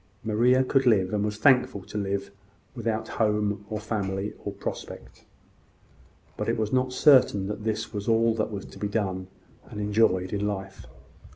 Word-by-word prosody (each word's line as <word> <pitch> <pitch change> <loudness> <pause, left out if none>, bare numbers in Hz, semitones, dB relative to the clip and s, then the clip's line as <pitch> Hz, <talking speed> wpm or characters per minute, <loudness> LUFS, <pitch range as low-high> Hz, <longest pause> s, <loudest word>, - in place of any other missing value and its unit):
Maria 120 +4 +3
could 130 0 +2
live, 100 -4 +3
and 105 -1 +1
was 105 0 -2
thankful 125 -4 +3
to - - -13
live, 100 -1 -2 0.4
without 115 -2 -2
home, 105 -2 0
or 105 - -3
family, 100 -2 -3
or 100 - -3
prospect. 100 - -8 1.1
But - - -2
it - - 0
was 110 +1 -2
not 130 0 +1
certain 130 -7 +5
that 105 +2 -5
this 110 -1 -2
was 100 -1 -4
all 115 0 +3
that 110 -1 -1
was 100 -2 -6
to - - -13
be 105 - -1
done 95 -3 -2 0.4
and 105 - -7
enjoyed 105 -3 +2
in 105 0 -1
life. 95 -1 -6
105 Hz, 170 wpm, -26 LUFS, 100-115 Hz, 1.1 s, certain